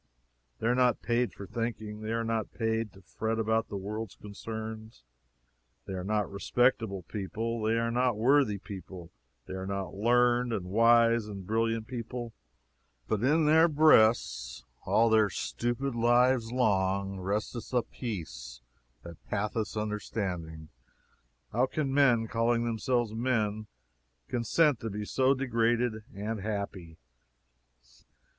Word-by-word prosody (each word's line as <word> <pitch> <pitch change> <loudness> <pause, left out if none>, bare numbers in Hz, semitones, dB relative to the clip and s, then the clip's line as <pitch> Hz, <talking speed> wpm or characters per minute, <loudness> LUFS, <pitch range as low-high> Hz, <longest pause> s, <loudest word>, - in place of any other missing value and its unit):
They - - -6
are 120 - +4
not 125 -2 +2
paid 120 0 +1
for 100 - -9
thinking 110 -1 -4
they 110 +1 -4
are 115 0 0
not 115 -2 -2
paid 110 -1 -1
to 95 - -17
fret 110 +5 -3
about 110 0 +1
the 100 - -5
world's 105 +2 -5
concerns. 110 - -8 0.8
They 95 - -6
were 90 -1 -4
not 105 +1 0
respectable 110 -1 +1
people 110 +6 -4
they 110 +1 +1
were 115 0 0
not 125 -2 +1
worthy 125 -2 +3
people 95 -3 -9 0.3
they - - -8
were 95 0 -5
not 100 -1 -3
learned 120 +3 +2
and 95 -5 -2
wise 115 0 +4
and 100 -3 -7
brilliant 115 +1 0
people 120 -1 -6 0.7
but 110 -2 0
in 155 +4 +3
their 160 +2 +6
breasts, 110 - +3 0.2
all 115 - +4
their 110 -2 +4
stupid 120 +6 -2
lives 120 0 +3
long, 100 -5 +1
resteth 105 +5 -3
a 125 -2 +2
peace - - -7 0.4
that 85 -2 -11
passeth 105 +1 -2
understanding! 95 -7 -4 0.8
How 125 +4 +3
can 140 -1 -2
men, 125 -5 +4
calling 115 +1 +1
themselves 120 0 0
men, 110 -3 -1 0.6
consent 125 +3 +2
to 115 - -4
be 105 +1 -4
so 130 +5 +2
degraded 120 -3 0
and 105 +1 -4
happy. 100 -5 -5
110 Hz, 135 wpm, -29 LUFS, 100-120 Hz, 0.8 s, their